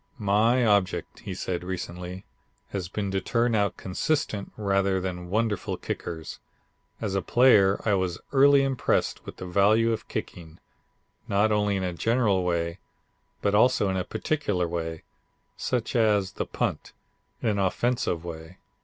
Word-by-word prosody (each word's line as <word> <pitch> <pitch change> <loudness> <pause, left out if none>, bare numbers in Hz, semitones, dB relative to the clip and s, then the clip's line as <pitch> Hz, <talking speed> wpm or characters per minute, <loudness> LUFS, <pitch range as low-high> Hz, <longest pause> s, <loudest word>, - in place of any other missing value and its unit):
"My 110 +5 +3
object," 100 -4 +1
he - - -6
said 90 -1 -3
recently, 90 0 -6 0.4
"has 95 -4 -4
been 100 0 -3
to 95 0 0
turn 115 +4 +1
out 100 -2 +1
consistent 105 +1 -2
rather 100 -2 +1
than 90 -1 -5
wonderful 105 -1 -1
kickers. 80 -2 -6 0.6
As 105 -4 -3
a 95 - +1
player 105 -6 +5
I 105 - +3
was 95 -3 0
early 140 0 +6
impressed 135 -2 0
with - - -8
the 95 - -7
value 105 +5 +3
of 110 - -5
kicking, 85 -1 -6 0.7
not 100 +2 +2
only 105 -1 +2
in 95 - -1
a 90 -1 -2
general 105 -1 +1
way 85 0 -1 0.6
but 100 - +2
also 110 -1 +4
in 95 - -1
a 95 - 0
particular 100 - -1
way, 80 -1 -4 0.5
such 125 -2 -2
as 105 -4 +3
the - - -4
punt - - -3 0.5
in 115 - +2
an 100 -2 0
offensive 95 -2 0
way. 80 +1 -8
100 Hz, 150 wpm, -26 LUFS, 90-110 Hz, 0.7 s, early